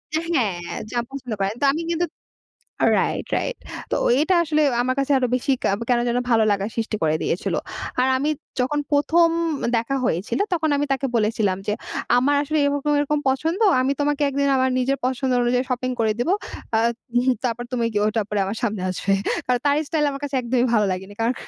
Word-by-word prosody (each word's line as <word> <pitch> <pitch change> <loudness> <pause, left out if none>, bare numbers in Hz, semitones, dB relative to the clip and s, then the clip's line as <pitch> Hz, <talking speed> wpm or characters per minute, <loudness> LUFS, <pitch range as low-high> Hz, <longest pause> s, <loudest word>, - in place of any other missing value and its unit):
এ্যা 315 - +2
হ্যাঁ 210 - +1 0.3
যা 240 - 0
পছন্দ 265 -4 -7
করে। 195 0 +1
তো - - +3
আমি 325 - -2
কিন্তু 340 +1 +1 0.9
রাইট, - - -1
রাইট। - - -3 0.4
তো - - +3 0.2
এটা 360 +4 +2
আসলে 305 -1 +1 0.2
আমার 255 +1 0
কাছে 275 +1 0
আরো 255 - +1
বেশি 270 +2 0
ক্যা - - +3 0.2
কেন 245 - +4
যেন 240 - +1
ভালো 225 -1 +4
লাগার 200 +2 -2
সৃষ্টি 225 -1 -1
করে 155 0 +2
দিয়েছিল। 175 - -1 0.5
আর 260 - +3
আমি 295 +3 0 0.3
যখন 295 +4 0
১ম 330 +4 +4 0.5
দেখা 230 +4 -1
হয়েছিল 185 - -1
তখন 320 -2 0
আমি 290 +1 0
তাকে 270 0 0
বলেছিলাম 210 -3 +1
যে, 210 - +2 0.5
আমার 285 +3 +3
আসলে 305 +2 -1
এরকম, 285 +1 0
এরকম, 300 +1 0
পছন্দ, 325 - -1 0.2
আমি 265 +2 +1
তোমাকে 290 0 +1
একদিন 280 +1 0
আমার 260 0 +2
নিজের 270 +2 0
পছন্দ 260 0 -1
অনুযায়ী 245 +1 +1
শপিং 255 0 -1
করে 220 -1 +2
দিবো। 275 +11 +2 0.4
"আ - - +4 0.4
উহুম 255 +1 +3
তারপর 240 0 -1
তুমি 240 -2 0
গি - - +2
ওটা 215 0 +1
পরে 210 -1 0
আমার 200 +3 -3
সামনে 210 -4 -2
আসবে।" 185 +2 -1 0.3
কারণ 250 -1 +1
তার 285 - +4
স্টাইল 310 -2 +1
আমার 275 0 -6
কাছে 280 -2 -2
একদমই 245 +1 +1
ভালো 210 -2 +3
লাগেনি। 190 +2 -6
কারণ 230 +3 +1
255 Hz, 195 wpm, -22 LUFS, 225-285 Hz, 0.9 s, কেন